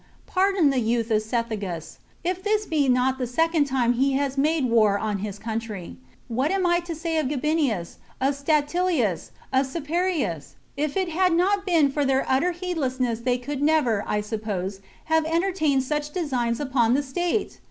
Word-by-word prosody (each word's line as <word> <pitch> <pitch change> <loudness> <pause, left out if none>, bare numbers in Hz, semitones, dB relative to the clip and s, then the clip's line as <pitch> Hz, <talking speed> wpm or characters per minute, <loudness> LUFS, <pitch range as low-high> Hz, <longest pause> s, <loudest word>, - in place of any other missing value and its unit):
Pardon 380 -5 +2
the 265 - +1
youth 230 0 0
of 215 -1 +3
Cethegus, 215 -7 -4 0.2
if 365 +1 -1
this 425 +1 +1
be 295 -6 +1
not 255 +1 +2
the 250 - -1
second 325 +4 +2
time 255 -3 +1
he 270 +3 +1
has 275 0 0
made 300 +1 +2
war 220 -4 +3
on 210 -1 -2
his 205 0 -5
country. 220 -4 -5 0.3
What 255 +5 0
am 385 -1 +1
I 345 0 +3
to 345 -1 -6
say 325 0 -2
of 300 - 0
Gabinius, 280 - -1 0.2
of 270 +2 +2
Statilius, 290 - 0 0.2
of 265 +1 +3
Caeparius? 315 - -2 0.2
If 295 +3 -2
it 375 -2 0
had 360 +2 +2
not 390 +3 +2
been 320 -6 +4
for 290 +1 0
their 270 -1 +1
utter 275 +7 +2
heedlessness 265 -10 -2
they 245 +1 0
could 275 +3 -5
never, 290 -9 +2
I 210 - 0
suppose, 205 -3 -4 0.3
have 320 0 +2
entertained 325 -5 +1
such 295 +2 -2
designs 255 -9 -1
upon 255 -4 +2
the 285 - +1
state! 350 +9 -2
275 Hz, 175 wpm, -24 LUFS, 235-330 Hz, 0.3 s, been